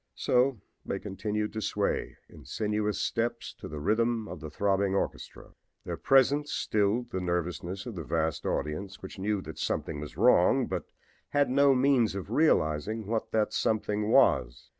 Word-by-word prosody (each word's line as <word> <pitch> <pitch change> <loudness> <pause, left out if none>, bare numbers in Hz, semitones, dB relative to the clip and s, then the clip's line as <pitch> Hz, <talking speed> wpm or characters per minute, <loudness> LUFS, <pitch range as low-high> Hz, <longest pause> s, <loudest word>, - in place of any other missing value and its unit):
So 125 -1 +2 0.2
they - - -3
continued 105 +2 -3
to 110 - -3
sway - - -1
in - - -15
sinuous 105 -1 -1
steps 120 +1 -2
to - - -7
the 75 -1 -6
rhythm 110 +5 +1
of 90 -3 -7
the 75 - -7
throbbing 100 +3 +1
orchestra. - - -4 0.3
Their - - -4
presence 140 +2 +3
stilled 110 +4 0
the 95 - -2
nervousness 90 +2 -3
of 120 - -6
the 85 -4 -5
vast 80 -1 -1
audience, 95 +7 -3
which 95 - -8
knew 100 0 -1
that - - -9
something 75 - -2
was 75 0 -8
wrong, - - +4
but - - -4 0.4
had 145 -3 +2
no 140 0 +5
means 125 -5 +3
of 100 +1 -6
realizing 110 - +1
what 110 +2 -2
that 110 -1 0
something 105 -1 0
was. - - +3
105 Hz, 160 wpm, -29 LUFS, 95-120 Hz, 0.4 s, no